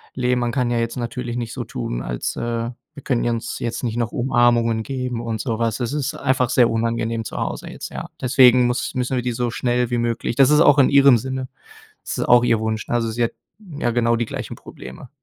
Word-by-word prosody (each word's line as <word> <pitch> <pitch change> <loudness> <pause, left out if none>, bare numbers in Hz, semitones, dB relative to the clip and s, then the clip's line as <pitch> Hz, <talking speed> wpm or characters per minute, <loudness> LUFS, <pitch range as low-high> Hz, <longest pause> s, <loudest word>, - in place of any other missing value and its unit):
leben. 125 -1 +1
Man 120 -1 0
kann 125 -2 0
ja 120 -1 0
jetzt 115 +2 -2
natürlich 120 0 -4
nicht 115 -2 -4
so - - -4
tun, - - -4
als, - - -3
äh 115 0 -2 0.2
Wir 140 - -12
können 125 -4 0
uns 115 -1 -3
jetzt 120 +2 -4
nicht 115 -2 -2
noch 115 -1 -1
Umarmungen 120 -2 +2
geben 125 -3 -4
und 115 -2 -3
sowas. 115 -2 -1
Das 125 +2 -3
ist 150 +1 -2
einfach 130 -3 +1
sehr 120 -2 +4
unangenehm 115 0 -1
zu - - -7
Hause - - -4
jetzt, - - -7
ja. - - -7
Deswegen 125 -1 +5
muss 120 +2 -2
müssen 130 +1 -1
wir 125 - 0
die 125 - -1
so 120 0 -1
schnell 120 0 0
wie 120 - +1
möglich 115 0 -1
Das 135 0 +5
ist 150 0 +5
auch 145 -3 +6
in 130 - +5
ihrem 140 -3 +6
Sinne. 130 +2 -4 0.6
Das - - -4
ist - - 0
auch 120 0 +6
ihr 115 -2 +2
Wunsch. 110 -1 -2
Ne, - - -2
also, 115 -1 0
sie 120 +1 0
hat - - -2 0.5
ja 120 - +1
genau 115 0 +2
die 115 -1 -1
gleichen - - -6
Probleme. 65 - -11
120 Hz, 235 wpm, -21 LUFS, 115-125 Hz, 0.6 s, auch